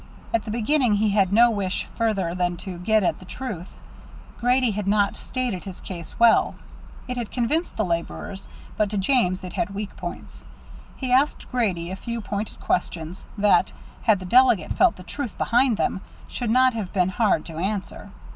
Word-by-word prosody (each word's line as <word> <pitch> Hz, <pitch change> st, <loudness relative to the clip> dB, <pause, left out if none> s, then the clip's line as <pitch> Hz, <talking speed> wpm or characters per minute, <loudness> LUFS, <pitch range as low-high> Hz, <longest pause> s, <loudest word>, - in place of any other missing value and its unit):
At 230 Hz, -, +1 dB
the -, -, -6 dB
beginning 240 Hz, +1 st, +2 dB
he 210 Hz, +1 st, +2 dB
had 195 Hz, -2 st, +3 dB
no 235 Hz, +3 st, +6 dB
wish 195 Hz, -3 st, -2 dB
further 200 Hz, -7 st, 0 dB
than 175 Hz, -1 st, -1 dB
to 180 Hz, -3 st, -6 dB
get 215 Hz, +3 st, +2 dB
at -, -, 0 dB
the 185 Hz, -, -12 dB
truth. 195 Hz, -4 st, -6 dB, 0.7 s
Grady 250 Hz, 0 st, +3 dB
had 205 Hz, -1 st, -3 dB
not 200 Hz, 0 st, +2 dB
stated 245 Hz, -8 st, -3 dB
his 190 Hz, -2 st, -8 dB
case 170 Hz, -3 st, -8 dB
well. 235 Hz, -1 st, +5 dB, 0.5 s
It 250 Hz, 0 st, -4 dB
had 235 Hz, -3 st, -3 dB
convinced 295 Hz, +8 st, -1 dB
the 215 Hz, -, +1 dB
laborers, 175 Hz, +3 st, -4 dB, 0.3 s
but 210 Hz, -1 st, +2 dB
to 210 Hz, -, -3 dB
James 190 Hz, -4 st, +2 dB
it 180 Hz, -, -7 dB
had 215 Hz, -4 st, -2 dB
weak 205 Hz, 0 st, -5 dB
points. -, -, -8 dB, 0.5 s
He 255 Hz, -2 st, -4 dB
asked 275 Hz, +4 st, +2 dB
Grady 185 Hz, -8 st, 0 dB
a -, -, -3 dB
few 235 Hz, +4 st, -5 dB
pointed 210 Hz, -1 st, -4 dB
questions, 165 Hz, +1 st, -2 dB
that, 205 Hz, 0 st, +3 dB, 0.3 s
had 220 Hz, -3 st, +4 dB
the 185 Hz, -, -8 dB
delegate 235 Hz, -4 st, +4 dB
felt 370 Hz, -2 st, +4 dB
the 185 Hz, -, -11 dB
truth 260 Hz, +4 st, -5 dB
behind 240 Hz, -1 st, +3 dB
him, 190 Hz, -, 0 dB, 0.3 s
should 240 Hz, -3 st, -3 dB
not 255 Hz, +2 st, +4 dB
have 215 Hz, -5 st, -4 dB
been 180 Hz, -2 st, +2 dB
hard 190 Hz, -4 st, +1 dB
to 160 Hz, -2 st, -8 dB
answer. 195 Hz, +3 st, -3 dB
210 Hz, 185 wpm, -24 LUFS, 185-240 Hz, 0.7 s, no